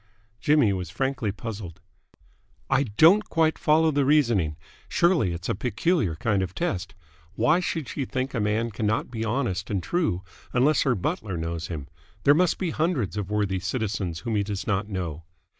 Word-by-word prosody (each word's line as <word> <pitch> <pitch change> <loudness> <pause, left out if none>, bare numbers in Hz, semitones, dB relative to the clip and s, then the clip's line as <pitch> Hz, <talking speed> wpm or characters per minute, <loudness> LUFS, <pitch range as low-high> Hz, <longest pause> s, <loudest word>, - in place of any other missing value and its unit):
Jimmy 145 -7 +4
was 90 -3 -4
frankly 125 +1 -1
puzzled. 100 -4 -7 0.9
"I 135 0 +4
don't 165 - +5
quite 160 -1 +2
follow 160 +1 +4
the 145 -1 +2
reasoning. 120 - +2 0.3
Surely 170 - +3
it's 85 +2 -5
a - - +1
peculiar 115 - 0
kind 100 +4 0
of 95 -1 -4
test. 90 +2 -2 0.4
Why 155 - +3
should 165 -5 -2
she 135 - -3
think 130 +1 -3
a 115 - -1
man 110 +2 0
cannot 110 +3 -1
be 115 -2 -3
honest 110 -5 -1
and 95 -4 -1
true 155 - 0 0.3
unless 135 +5 +3
her 135 -4 +2
butler 95 0 -2
knows 80 0 -3
him? 75 -5 -6 0.4
There 145 - +7
must 175 +3 +2
be 180 -4 -2
hundreds 155 - 0
of 100 -2 -3
worthy 100 -3 0
citizens 95 -4 -2
whom 115 -2 -2
he 105 - +2
does 100 -1 -4
not 105 0 -1
know." 85 -5 -4
110 Hz, 175 wpm, -26 LUFS, 95-140 Hz, 0.9 s, There